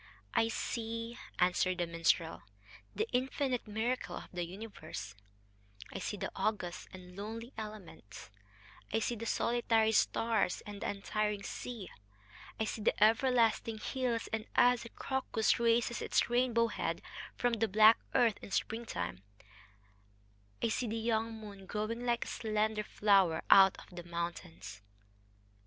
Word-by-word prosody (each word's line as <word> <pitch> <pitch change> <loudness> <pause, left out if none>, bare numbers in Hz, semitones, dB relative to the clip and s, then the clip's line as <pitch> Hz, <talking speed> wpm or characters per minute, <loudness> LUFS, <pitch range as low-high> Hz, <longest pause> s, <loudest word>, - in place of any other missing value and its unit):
"I 225 - +3
see," 230 +1 -4 0.2
answered 180 0 +2
the 175 - 0
minstrel, 165 0 +1 0.5
"the - - 0
infinite 255 -1 0
miracle 225 +4 -2
of - - -9
the 175 -1 -2
universe, 170 - -7 0.8
I - - -4
see 205 - -3
the - - -4
august 190 -5 -2
and 180 -1 -11
lonely 225 +5 -6
elements, 195 - -9 0.6
I 220 - +2
see 230 +2 0
the 230 +1 -5
solitary 225 -2 +2
stars 220 -2 +2
and 205 -1 -8
the - - -1
untiring 205 0 -1
sea, 230 -7 -6 0.7
I - - +2
see 220 0 -3
the 210 - +3
everlasting 230 -1 +3
hills 240 0 -2
and, 220 0 -2
as 245 -1 +4
a - - -8
crocus 265 -5 0
raises 235 0 +2
its - - +1
rainbow 240 -2 +3
head - - -3 0.3
from 245 -1 +1
the 225 0 +1
black 215 +3 +7 0.2
earth 230 -4 +4
in - - -9
springtime, 95 - -2 1.4
I - - +3
see 240 +2 -1
the 225 +1 -2
young 225 0 0
moon 205 -3 -10
growing 230 +4 -3
like 235 -1 +1
a - - -9
slender 215 -1 0
flower 195 -6 +3
out 195 -1 +8
of 180 - -13
the 175 - -5
mountains...." 110 - -6
220 Hz, 140 wpm, -33 LUFS, 190-230 Hz, 1.4 s, out